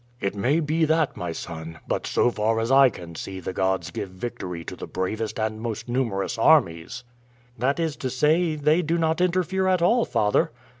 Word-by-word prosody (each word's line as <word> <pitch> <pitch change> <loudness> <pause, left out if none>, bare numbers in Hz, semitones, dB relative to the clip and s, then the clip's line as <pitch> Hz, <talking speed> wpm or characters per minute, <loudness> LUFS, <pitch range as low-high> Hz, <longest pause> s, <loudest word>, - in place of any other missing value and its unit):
"It 100 - -1
may 130 +11 +1
be 160 +2 0
that, 160 -1 +1
my 90 -1 -4
son; 80 0 -7
but - - -2
so 120 - +2
far 110 0 0
as 115 +3 -1
I 135 -1 +7
can 85 -6 -10
see 95 +3 -6
the 95 +1 -5
gods 95 0 0
give 100 - -5
victory 90 -3 -6
to - - -7
the - - -8
bravest 110 +5 -3
and 110 0 -2
most 115 0 -4
numerous 115 -3 -1
armies." 115 - +3 0.6
"That 135 +6 +1
is 160 -3 -1
to 130 - -3
say, 155 +6 +2
they 155 +3 +2
do 170 0 0
not 160 0 +1
interfere 185 +1 +1
at 185 -2 +2
all, 230 +6 +4
father." 105 0 +2
120 Hz, 195 wpm, -24 LUFS, 95-160 Hz, 0.6 s, I